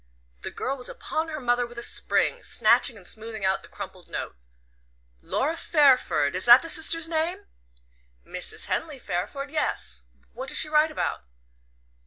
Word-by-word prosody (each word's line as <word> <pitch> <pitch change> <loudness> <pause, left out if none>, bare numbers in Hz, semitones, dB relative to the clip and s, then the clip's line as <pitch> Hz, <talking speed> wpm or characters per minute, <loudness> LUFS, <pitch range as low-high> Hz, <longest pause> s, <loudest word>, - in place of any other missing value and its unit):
The - - -5
girl 270 +1 -4
was 250 - -6
upon 315 +1 -3
her 310 -1 -5
mother 245 -1 0
with 240 0 -14
a 235 - -5
spring, - - 0
snatching 240 - +2
and 185 -3 -10
smoothing 220 -2 -2
out 190 0 +1
the - - -15
crumpled - - -10
note. - - -5 0.9
"Laura 310 +4 -1
Fairford 260 - +2
is 185 - -2
that 240 +4 +8
the 330 - +3
sister's 330 0 +4
name?" 325 +1 -2 0.8
"Mrs. - - -1
Henley 310 -4 -3
Fairford; 270 +7 -5
yes. 310 - -2 0.3
What - - -5
does - - +3
she 305 - +3
write 305 +1 +3
about?" 305 - -4
275 Hz, 160 wpm, -25 LUFS, 235-315 Hz, 0.9 s, that